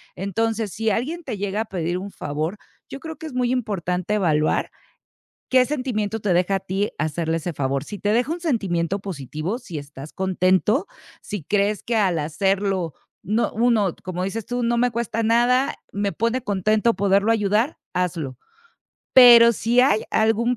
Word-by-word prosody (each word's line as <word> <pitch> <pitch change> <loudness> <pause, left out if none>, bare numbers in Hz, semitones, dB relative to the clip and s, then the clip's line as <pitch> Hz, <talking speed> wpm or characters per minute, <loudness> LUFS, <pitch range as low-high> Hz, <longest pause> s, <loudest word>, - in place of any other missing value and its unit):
Entonces, 220 +2 -2
si 225 0 -1
alguien 290 - -2
te 220 - -5
llega 200 +2 -2
a - - -3
pedir 175 -3 -2
un 195 +2 -6
favor, 155 +6 -4 0.3
yo 275 - -7
creo 320 +1 -8
que 320 - -7
es 300 - -9
muy 250 -1 0
importante 200 -5 -1
evaluar 155 -6 +1 0.8
qué 255 -1 +5
sentimiento 230 -7 -2
te 205 -2 0
deja 180 +3 +2
a - - -3
ti 195 +2 -2
hacerle 160 +2 -1
ese 170 +2 -4
favor. 135 -1 -2
Si 205 - -7
te 205 +1 0
deja 245 +6 +1
un 345 - -5
sentimiento 195 - -1
positivo, 165 - -4
si 180 - -7
estás 145 0 -10
contento, 190 - +1 0.3
si 205 -4 -6
crees 205 +3 0
que 235 - -1
al 190 -6 +2
hacerlo 190 +2 -1 0.3
no 215 +5 0
uno, 220 -5 +2
como 180 0 -3
dices 210 +2 -4
tú, 245 0 -2
no 235 0 +1
me 245 +1 +2
cuesta 230 -1 -2
nada, 240 +4 +3 0.2
me 200 0 -1
pone 230 +3 0
contento 215 +2 +1
poderlo 200 +2 +2
ayudar, 220 +5 +1 0.2
hazlo. 165 -8 -2 0.8
Pero 235 -2 +9
si 235 +3 +2
hay 250 -5 +3
algún 225 +3 +2
205 Hz, 170 wpm, -22 LUFS, 180-235 Hz, 0.8 s, Pero